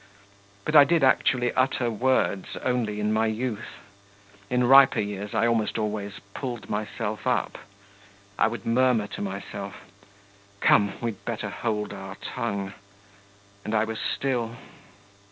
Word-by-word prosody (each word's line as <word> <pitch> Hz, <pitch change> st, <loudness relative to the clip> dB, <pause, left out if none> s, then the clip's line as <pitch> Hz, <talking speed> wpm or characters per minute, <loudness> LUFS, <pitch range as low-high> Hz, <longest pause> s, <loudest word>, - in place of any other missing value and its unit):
But 155 Hz, -, -1 dB
I 145 Hz, -, +11 dB
did 165 Hz, +2 st, +2 dB
actually 125 Hz, -1 st, +3 dB
utter 130 Hz, -2 st, +1 dB
words 120 Hz, -4 st, 0 dB
only 115 Hz, -5 st, 0 dB
in 105 Hz, +1 st, 0 dB
my 110 Hz, +1 st, +2 dB
youth; 110 Hz, 0 st, -4 dB, 0.7 s
in 125 Hz, 0 st, +2 dB
riper 135 Hz, +2 st, +7 dB
years 105 Hz, 0 st, -4 dB
I -, -, +3 dB
almost 115 Hz, -2 st, +1 dB
always 105 Hz, -2 st, -2 dB, 0.2 s
pulled 125 Hz, -4 st, -5 dB
myself 105 Hz, +1 st, -3 dB
up. 125 Hz, -, 0 dB, 0.8 s
I 110 Hz, -, +3 dB
would 115 Hz, +1 st, -5 dB
murmur 120 Hz, -2 st, +3 dB
to 100 Hz, -, -7 dB
myself: 100 Hz, 0 st, -5 dB, 0.8 s
'Come, 100 Hz, -1 st, +4 dB
we'd 115 Hz, -4 st, -4 dB
better 110 Hz, -3 st, -3 dB
hold 105 Hz, -1 st, -2 dB
our 95 Hz, -1 st, -8 dB
tongue.' 100 Hz, 0 st, -4 dB, 0.9 s
And 110 Hz, -, -2 dB
I 105 Hz, -, +3 dB
was 110 Hz, 0 st, -4 dB
still. 120 Hz, -4 st, -1 dB
110 Hz, 135 wpm, -26 LUFS, 105-125 Hz, 0.9 s, I